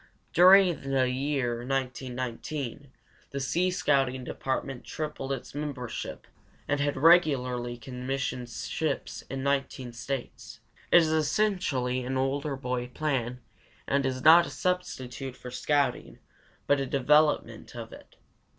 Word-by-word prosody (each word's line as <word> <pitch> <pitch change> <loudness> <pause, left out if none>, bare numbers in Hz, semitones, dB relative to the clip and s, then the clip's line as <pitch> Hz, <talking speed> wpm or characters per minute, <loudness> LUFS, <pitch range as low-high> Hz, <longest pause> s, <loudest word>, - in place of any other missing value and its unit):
During 180 -5 +6
the 130 -1 +2
year 130 -2 -1
1919 130 +1 -4 0.4
the 140 - -4
sea 170 +7 +1
scouting 135 -7 +1
department 130 0 -3
tripled 150 -3 -5
its 135 -2 -5
membership 140 -5 -5 0.4
and 145 0 0
had 145 -1 0
regularly 130 -7 +3
commissioned 125 0 -4
ships - - -3
in 135 0 -4
19 135 -3 -1
States. 120 -2 -6 0.3
It 175 - +8
is 160 - 0
essentially 155 - +1
an 130 +1 -2
older 140 +2 -1
boy 125 -2 -3
plan 125 -3 -2 0.5
and 140 0 +2
is 130 -1 -2
not 170 +2 +8
a - - -6
substitute 135 -8 -3
for 125 - -9
scouting 140 -1 0 0.5
but 145 - +3
a 135 - -2
development 150 +3 +2
of - - -7
it. - - -14
135 Hz, 125 wpm, -28 LUFS, 125-150 Hz, 0.5 s, It